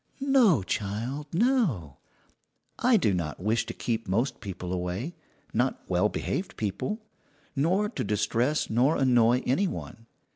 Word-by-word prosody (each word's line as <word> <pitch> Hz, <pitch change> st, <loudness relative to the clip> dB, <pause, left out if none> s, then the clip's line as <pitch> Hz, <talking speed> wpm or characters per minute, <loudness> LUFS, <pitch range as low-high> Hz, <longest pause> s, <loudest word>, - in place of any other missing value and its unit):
"No, 210 Hz, -, +5 dB
child, 115 Hz, +10 st, -3 dB
no; 170 Hz, -, +1 dB, 0.8 s
I 245 Hz, -1 st, +5 dB
do 110 Hz, -, +2 dB
not 80 Hz, -4 st, -3 dB
wish 110 Hz, +4 st, 0 dB
to -, -, -4 dB
keep 115 Hz, -2 st, -2 dB
most 120 Hz, +7 st, 0 dB
people 90 Hz, -3 st, -5 dB
away 90 Hz, -, -3 dB, 0.4 s
not -, -, +1 dB
well -, -, +2 dB
behaved -, -, -3 dB
people 110 Hz, -, -2 dB, 0.6 s
nor 180 Hz, +9 st, +2 dB
to -, -, -4 dB
distress 115 Hz, +7 st, +1 dB
nor 125 Hz, +7 st, +2 dB
annoy 125 Hz, -1 st, +4 dB
any 185 Hz, +11 st, +2 dB
one. 115 Hz, -8 st, -7 dB
120 Hz, 135 wpm, -28 LUFS, 100-160 Hz, 0.8 s, No